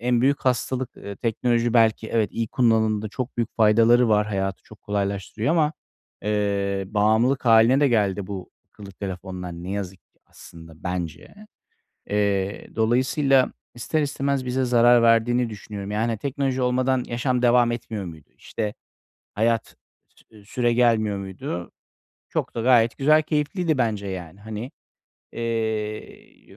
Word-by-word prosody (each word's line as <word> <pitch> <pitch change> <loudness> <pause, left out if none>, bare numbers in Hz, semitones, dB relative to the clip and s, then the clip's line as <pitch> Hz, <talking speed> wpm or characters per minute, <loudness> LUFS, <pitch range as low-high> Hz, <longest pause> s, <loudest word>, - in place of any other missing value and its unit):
en 120 0 +1
büyük 140 +2 +2
hastalık, 130 0 -1
eee, 100 0 -8
teknoloji, 120 +1 0
belki, 110 -1 +3
evet, 110 -2 0
iyi 115 -1 -2
kullanımda 110 -3 +1
çok 125 +3 -5
büyük 115 -2 -3
faydaları 115 +2 +5
var. 105 -1 +3
Hayatı 95 -2 -3
çok 110 - -17
kolaylaştırıyor 100 +3 -2
ama, 160 -2 +2 0.5
eee, 100 -2 -1
bağımlılık 110 +6 +2
hâline 115 +4 +5
de 145 - +4
geldi 100 -5 +1
bu 95 -2 -7 0.2
akıllı 100 -2 -12
telefonlar 95 -2 -6
ne 85 +2 -7
yazık 95 -2 -4
ki - - -40
aslında 80 -1 -14
bence. 85 - -5 0.8
Eee, 100 -1 -1
dolayısıyla 130 +4 +2 0.2
ister 155 +6 -1
istemez 140 -2 -1
bize 130 +1 0
zarar 120 -1 +5
verdiğini 115 +1 +3
düşünüyorum. 100 -1 -7
Yani, 110 +1 -1
teknoloji 135 0 -2
olmadan 125 0 +1
yaşam 125 +1 -1
devam 120 -1 +4
etmiyor 110 -3 -5
muydu? 80 -4 -11
İşte, 105 -2 -4 0.6
hayat 115 +1 0 0.4
sü 105 -2 -20
süre 120 +2 0
gelmiyor 110 -4 +2
muydu? 90 -2 -6 0.6
Çok - - -3
da 115 - -2
gayet 120 -2 +4
güzel 155 +3 +4
keyifliydi 155 +1 -1
bence, 110 -5 -1
yani. 90 -1 -7
Hani, 110 +4 -6 0.6
eee, 110 -2 -5
115 Hz, 135 wpm, -23 LUFS, 100-125 Hz, 0.8 s, faydaları